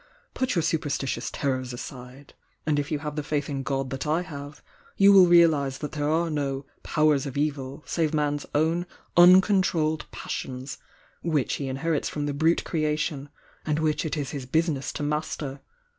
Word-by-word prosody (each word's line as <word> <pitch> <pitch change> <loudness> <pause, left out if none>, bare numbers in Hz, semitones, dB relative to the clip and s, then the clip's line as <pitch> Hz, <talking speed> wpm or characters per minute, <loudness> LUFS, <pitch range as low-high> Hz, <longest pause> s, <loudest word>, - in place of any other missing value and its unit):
Put 260 -4 -1
your 170 - +2
superstitious 150 -4 -1
terrors 130 -3 -2
aside— 125 +2 -9 0.3
and 150 -2 +2
if 145 0 -3
you 150 - +1
have 150 0 -5
the 150 - -1
faith 145 0 -2
in 135 -1 -2
God 135 -1 -2
that 135 +3 -4
I 160 +4 +1
have, 145 -3 -9 0.3
you 200 0 +7
will 190 -2 +8
realise 160 -6 +4
that 150 - -5
there 145 -1 -1
are 165 +1 +1
no 140 -2 -2 0.2
'powers 150 -2 +2
of 135 - -6
evil' 140 -1 -2
save 160 -3 0
man 150 -2 +1
s 145 - -5
own 165 +4 +1 0.3
uncontrolled 175 -3 +5
passions, 130 +1 -6 0.4
which 155 -6 0
he 140 - -4
inherits 145 +4 -1
from 145 -1 -3
the 145 - -2
brute 160 +4 +2
creation, 150 -2 -1 0.3
and 150 -1 0
which 155 -1 0
it 160 -1 -2
is 140 -3 -3
his 135 -4 -6
business 155 -1 0
to - - -4
mas 150 +1 -1
ter! 140 -2 -6
150 Hz, 180 wpm, -26 LUFS, 140-160 Hz, 0.4 s, will